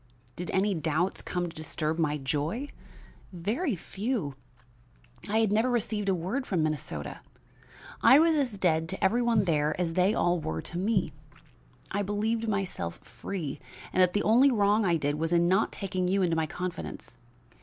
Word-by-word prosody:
"Did 180 - -6
any 195 +2 +2
doubts 160 +2 -1
come 180 -1 -2
to 165 - -10
disturb 155 +1 -3
my 150 -2 +1
joy? 150 - -2 0.6
Very 215 - -1
few. 195 - -3 1.0
I 215 - +1
had 220 -3 +2
never 220 +4 +3
received 215 -4 0
a 190 - +3
word 195 +11 -3
from 175 -5 +1
Minnesota. 155 -1 -3 0.8
I 265 - +8
was 325 +1 +4
as 260 -8 0
dead 165 -3 +1
to 190 +2 -4
every 220 +6 +3
one 230 -4 +3
there 155 -2 +1
as 170 -2 0
they 185 +5 +3
all 175 0 +2
were 80 - -3
to 175 - -4
me. 195 -5 0 0.8
I 205 - 0
believed 220 +3 -1
myself 195 - -2
free 170 -8 -5 0.3
and 185 - +3
that 180 -1 +4
the 205 - +1
only 245 +6 +5
wrong 210 -2 +3
I 170 -2 +3
did 145 0 -1
was 165 +1 -1
in 170 0 +4
not 190 +4 +2
taking 185 -2 -2
you 195 +1 +2
into 170 -2 +1
my 160 -1 0
confidence. 180 +3 -6
185 Hz, 175 wpm, -28 LUFS, 165-215 Hz, 1.0 s, I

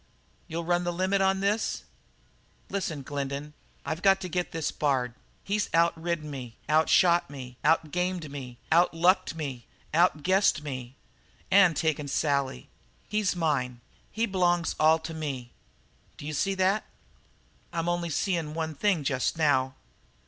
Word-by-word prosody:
You'll 170 +1 -3
run 175 +1 +1
the 175 - -1
limit 185 +3 +1
on 190 0 +2
this?" 205 +3 0 0.9
"Listen, 165 -8 -3
Glendin. 140 +1 -4 0.3
I've 160 +2 -3
got 195 0 +5
to 185 - -4
get 180 +1 -2
this 165 -2 -2
Bard. 130 -5 0 0.3
He's 205 +1 -1
out 170 0 +4
ridden 165 -2 -3
me, 125 -5 -7
out 155 +1 +3
shot 175 -4 +4
me, 130 -3 -9
out 160 -1 +3
gamed 180 -3 -2
me, 130 -4 -7
out 170 +1 +4
lucked 175 +1 +3
me, 135 -6 -5 0.3
out 165 -2 +3
guessed 185 -4 +3
me 130 -3 -6 0.6
and 190 -5 +6
taken 150 -2 0
Sally. 140 - 0 0.4
He's 210 -3 +1
mine. 135 -8 0 0.3
He 225 +2 0
b'longs 175 -4 +1
all 155 +1 +6
to 160 0 -7
me. 135 -6 -5 0.7
D'you 150 +1 -6
see 195 +6 0
that?" 190 +3 +2 0.9
"I'm 170 -1 -2
only 175 0 0
seein' 165 -2 -1
one 160 -1 -2
thing 180 0 +1
just 135 +1 0
now." 135 -4 +2
160 Hz, 150 wpm, -28 LUFS, 145-180 Hz, 0.9 s, and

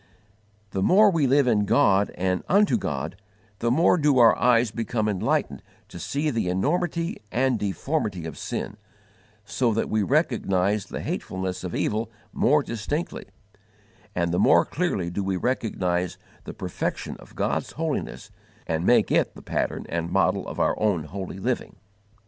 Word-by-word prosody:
The 95 - -2
more 200 - +6
we 160 -6 +2
live 140 +1 +4
in 105 -4 +2
God 100 -3 +3
and 90 0 -1
unto 205 +2 +4
God, 190 - -3 0.4
the 115 - 0
more 165 +8 +4
do 145 -3 +3
our 115 -2 +7
eyes 120 -2 +3
become 110 0 -2
enlightened 100 -4 0 0.3
to - - -9
see 150 +2 -1
the 115 -6 -1
enormity 165 - 0
and 125 -1 +1
deformity 105 - -2
of 80 - -6
sin, - - -5 0.7
so 115 0 0
that 115 - -1
we 110 0 +2
recognize 105 - +1
the - - -5
hatefulness 95 0 -4
of 90 - -4
evil 110 +2 -1 0.2
more 150 +3 +3
distinctly: 140 +10 -4 0.9
and 85 -1 0
the 90 - 0
more 85 - +5
clearly 120 - -2
do 100 +3 -2
we 95 -1 -1
recognize 90 -7 -1 0.3
the - - -7
perfection - - -4
of - - -16
God's - - -1
holiness 160 -1 -4 0.3
and 80 0 -1
make - - +4
it - - +2
the - - -12
pattern - - -2
and 85 0 -3
model - - +1
of - - -6
our - - +3
own 100 -7 +1
holy 95 +4 -6
living. 120 +5 -2
110 Hz, 155 wpm, -25 LUFS, 95-140 Hz, 0.9 s, our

